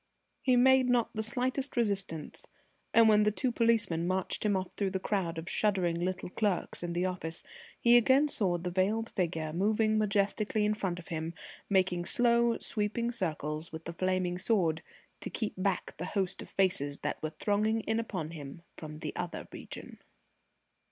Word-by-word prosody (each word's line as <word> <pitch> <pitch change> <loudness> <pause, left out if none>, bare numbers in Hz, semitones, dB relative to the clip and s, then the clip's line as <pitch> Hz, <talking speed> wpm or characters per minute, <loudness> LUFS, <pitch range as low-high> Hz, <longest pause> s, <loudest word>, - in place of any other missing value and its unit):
He 255 -2 +3
made 260 +1 +5
not 240 -2 +2
the 220 - -2
slightest 255 +4 -2
resistance, 195 -8 -2 0.4
and 230 -1 +6
when 210 -1 +6
the 210 - +4
two 245 +4 -1
policemen 220 -8 +1
marched 185 0 -1
him 210 -2 +2
off 185 -1 -5
through 200 -2 -1
the 190 0 -2
crowd 185 -4 -1
of 165 +1 -6
shuddering 185 -6 +1
little 180 0 -2
clerks 200 -2 -1
in 175 -1 -3
the 175 +2 0
office, 175 -3 -3 0.4
he 235 0 +5
again 260 +5 +5
saw 190 -10 +2
the 175 +1 -4
veiled 210 +5 0
figure 165 -4 -2
moving 215 +4 +2
majestically 210 +1 +1
in 210 - +2
front 190 -5 -2
of 175 - -11
him, 165 0 -4 0.3
making 185 -3 +2
slow 235 0 +4
sweeping 225 +2 -1
circles 155 - -3
with 160 0 -8
the 170 - -5
flaming 185 0 -1
sword, 175 -6 +1 0.4
to - - -5
keep 220 -3 -3
back 185 0 -1
the 170 - -4
host 190 -1 -1
of - - -10
faces 145 -7 +1
that - - -2
were 155 - -2
thronging 215 +2 +1
in 220 +1 -1
upon 180 -9 -4
him 155 +1 -9
from 155 0 -8
the - - -5
Other 175 -1 -5
Region. - - -9
195 Hz, 175 wpm, -31 LUFS, 175-220 Hz, 0.4 s, and